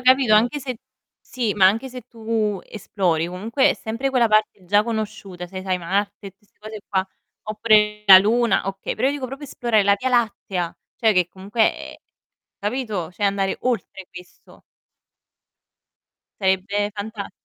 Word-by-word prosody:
capito, 255 -3 +5
anche 240 +7 +3
se 260 -3 -5 0.4
sì, 235 -5 -3
ma 190 -2 +6
anche 225 +7 +1
se 250 -1 -9
tu 220 -3 -2
esplori, 180 -6 -1
comunque 225 +10 +1
è - - 0
sempre 230 +5 -3
quella 250 -3 +3
parte 215 -1 +3
parte 185 - -22
già 205 +3 +3
conosciuta, 215 -5 -5
sai 185 +1 -7
sai, 185 -1 -1
Marte, 200 +3 -3
tutte 205 +2 -34
'ste - - -41
cose 215 0 -9
qua, 190 -1 0 0.4
oppure 210 -1 +2
la 190 -1 +11
luna, 230 +4 +2
okay, 195 0 -4
però 245 - +1
io 275 - +2
dico 275 -3 -4
proprio 270 +3 -8
esplorare 230 -5 +1
la 200 0 +5
Via 255 +6 -2
Lattea, 205 -7 -1 0.2
cioè 220 -2 +3
che 180 -3 +2
comunque 200 +5 -6
è - - -10 0.6
capito, 205 -6 -3
cioè, 205 - -9
andare 195 -1 0
oltre 220 -6 -3
questo. 180 0 -15 1.8
Sarebbe 200 +2 0
fanta 205 -1 -6
210 Hz, 160 wpm, -22 LUFS, 195-230 Hz, 1.8 s, la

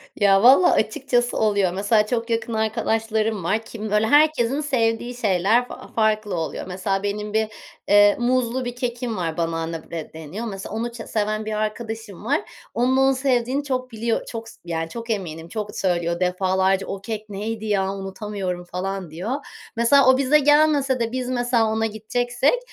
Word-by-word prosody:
Ya, 200 0 +4
valla, 275 +9 +7
açıkçası 245 -2 0
oluyor. 200 -4 +2
Mesela 210 +3 +2
çok 230 +1 -2
yakın 230 0 -1
arkadaşlarım 220 -2 0
var. 215 +6 +1
Kim 220 -2 -6
böyle, 210 +1 +3
herkesin 290 -1 +3
sevdiği 240 -3 0
şeyler 220 +2 +2
fa - - -10
farklı 215 -3 0
oluyor. 160 -4 -3
Mesela 195 +1 -2
benim 210 +1 -3
bir, 220 0 +2 0.4
eee, 205 0 +6
muzlu 250 +1 0
bir 245 0 -4
kekim 240 -2 -3
var, 165 -3 -3
banana 165 -1 -3
bread 165 -2 -6
deniyor. 160 +8 -6
Mesela 195 0 -6
onu 235 +2 -2
ç - - -14
seven 215 0 -1
bir 215 - -3
arkadaşım 215 -2 -4
var. 290 +6 +1 0.3
Onun 255 +2 +2
onu 270 0 +4
sevdiğini 260 +1 0
çok 255 -2 -3
biliyor 230 0 -1
çok 225 -1 -7
s - - -15
yani, 165 -1 -3
çok 230 +4 -8
eminim. 165 -6 -3
Çok 210 -2 -5
söylüyor, 170 -2 0
defalarca, 190 +1 +1
“O 195 - -5
kek 215 +1 -6
neydi 215 +2 -4
ya, 195 -2 0
unutamıyorum.” 195 -2 -4
falan 185 -1 -4
diyor. 180 +9 -4 0.4
Mesela 250 +4 +5
o 260 0 +6
bize 275 +3 +4
gelmese 290 -3 +3
de 230 0 -1
biz, 255 -1 -3
mesela, 245 -2 +1
ona 220 0 0
gideceksek, 245 - 0
220 Hz, 170 wpm, -23 LUFS, 195-245 Hz, 0.4 s, valla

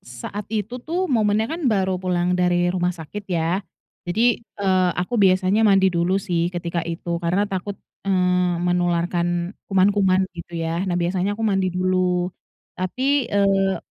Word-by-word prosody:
saat 155 +13 -8
itu 225 +3 -3
tuh 345 +7 -2
momennya 220 - +2
kan 335 - -4
baru 190 -3 0
pulang 180 -1 0
dari 175 -1 +2
rumah 180 -1 -1
sakit 200 +6 -8
ya. 170 +1 0 0.5
Jadi, 230 +6 +2
eee, 190 -5 0
aku 205 +6 -1
biasanya 190 +2 +3
mandi 190 -2 +4
dulu 175 +2 +1
sih 175 -4 0
ketika 175 -1 -3
itu, 170 0 -3
karena 180 +4 +1
takut, 195 0 -4 0.3
eee, 180 -2 +2
menularkan 175 0 0 0.2
kuman-kuman 190 -1 +3
gitu 170 0 -8
ya. 165 +1 -2
Nah, 175 - 0
biasanya 185 +3 0
aku 225 - -3
mandi 195 -3 +1
dulu. 180 0 0 0.4
Tapi, 260 +9 0
eee, 195 -1 +2
185 Hz, 145 wpm, -22 LUFS, 175-200 Hz, 0.5 s, mandi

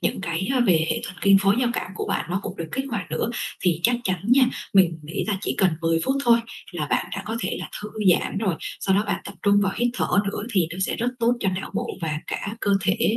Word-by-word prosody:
những - - -1
cái, 170 +3 -2
a, 255 - +3
về 170 -9 +4
hệ - - 0
thần 180 - -7
kinh 195 -1 +7
phối 195 +1 +3
giao 250 - +2
cảm 185 - -3
của - - -4
bạn - - -1
nó 185 - 0
cũng - - -6
được 165 -1 -5
kích 270 - -1
hoạt 200 -10 -3
nữa, 160 +8 -1 0.3
thì 170 -2 +1
chắc 240 +4 +4
chắn 185 -2 0
nha, 255 +1 +6 0.3
mình 175 -4 +5
nghĩ 155 +3 -3
là 200 - 0
chỉ - - -2
cần 190 -2 +4
10 165 0 +2
phút 265 - +1
thôi 235 -1 +6 0.3
là 155 -4 -2
bạn - - +1
đã 195 - -4
có 225 +1 -2
thể - - -2
là - - -5
thư 210 - -5 0.2
giãn 195 - -1
rồi. 195 -5 0 0.3
Sau 190 - +2
đó 205 - +3
bạn 205 - -1
tập - - -8
trung 205 0 +4
vào 195 -1 +1
hít 245 - +2
thở - - -1 0.2
nữa 200 +1 -3
thì 185 -6 +3
nó 180 - -7
sẽ 190 - 0
rất 240 +2 0
tốt 235 +1 +3
cho 195 - +1
não 185 0 -3
bộ - - -2
và 155 -3 -2
cả 205 +3 -4
cơ 200 - +1
thể 195 +4 +2
195 Hz, 275 wpm, -24 LUFS, 175-220 Hz, 0.3 s, kinh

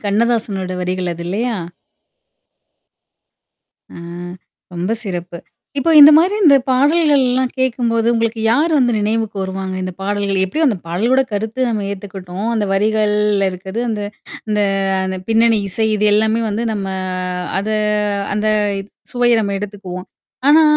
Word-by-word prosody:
கண்ணதாசனோட 205 -3 0
வரிகள் 180 0 -2
அது 170 - -7
இல்லயா! 225 +6 -1 2.4
ஆ. - - -13 0.8
ரொம்ப 180 +5 -2
சிறப்பு. 175 -2 -5 0.4
இப்போ 330 +5 +1
இந்தமாரி 310 +7 +8
இந்த 280 -4 +7
பாடல்கள்லாம் 265 -3 +2
கேட்கும்போது, 235 -3 0
உங்களுக்கு 230 -1 -1
யார் 310 +7 +2
வந்து 245 -3 +3
நினைவுக்கு 215 0 -1
வருவாங்க? 190 0 -4
இந்த 185 0 -4
பாடல்கள் 200 -1 -1
எப்படியோ 310 - -1
அந்த 230 -8 +1
பாடலோட 230 +11 +1
கருத்து 220 +4 -3
நம்ம 215 -3 -2
ஏத்துக்கிட்டோம், 195 +1 -6
அந்த 215 - 0
வரிகள்ல 210 0 +1
இருக்குது 190 +4 -6
அந்த 215 -2 -2 0.5
இந்த 210 0 +1 0.5
அந்த 190 0 -3
பின்னணி 225 0 +4
இசை, 220 +4 -1
இது 210 0 0
எல்லாமே 220 +2 +2
வந்து 215 +3 -2
நம்ம 200 -2 -3 0.7
அத 200 +2 -3 0.7
அந்த 215 +1 0 0.6
சுவைய 240 -2 +3
நம்ம 200 -2 -2
எடுத்துக்குவோம். 195 -3 -7 0.4
ஆனா 315 +2 +7
215 Hz, 125 wpm, -17 LUFS, 195-235 Hz, 2.4 s, இந்தமாரி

